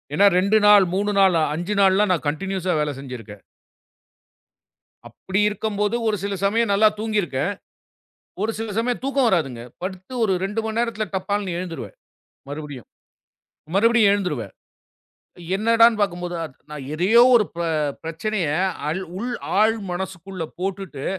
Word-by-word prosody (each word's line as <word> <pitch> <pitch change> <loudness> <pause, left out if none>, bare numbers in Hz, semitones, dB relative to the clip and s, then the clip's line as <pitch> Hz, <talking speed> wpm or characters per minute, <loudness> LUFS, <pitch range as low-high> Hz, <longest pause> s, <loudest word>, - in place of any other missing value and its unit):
ஏன்னா 200 - +5
2 200 +3 +3
நாள், 205 -2 +8
3 205 +1 0
நாள், 190 -3 +5 0.2
5 175 +5 -3
நாள்லாம் 195 +1 +4
நான் 160 - -3
கண்டினியூஸா 185 +3 -1
வேலை 150 - -1
செஞ்சிருக்கேன். 115 -7 -9 1.7
அப்படி 190 +2 -3
இருக்கும்போது 210 +1 -1
ஒரு 215 - +2
சில 200 0 -2
சமயம் 225 +1 +2
நல்லா 215 +2 +5
தூங்கிருக்கேன். 200 -8 -1 0.9
ஒரு 220 +2 0
சில 225 0 -4
சமயம் 240 +1 0
தூக்கம் 275 -2 +2
வராதுங்க. 135 - 0 0.2
படுத்து 185 +5 -6
ஒரு 195 -3 +2
2 220 +2 -2
நேரத்துல 225 -2 -1
டப்பான்னு 195 -2 -2
எழுந்துருவேன் 180 - -7 0.5
மறுபடியும் 145 -4 -8 0.9
மறுபடியும் 225 0 +4
எழுந்துருவேன். 150 - -2 1.0
என்னடான்னு 230 +1 +4
பார்க்கும்போது 175 -3 -1 0.4
நான் 145 -3 -7
எதையோ 195 +9 +4
ஒரு 225 - +5 0.6
பிரச்சனையை 165 -1 -2 0.3
அள 155 - 0 0.2
உள் 245 +3 -3 0.3
ஆழ் 220 +1 +4
மனசுக்குள்ள 185 -1 -5 0.2
போட்டுட்டு 190 -7 -4
195 Hz, 120 wpm, -22 LUFS, 170-215 Hz, 1.7 s, நாள்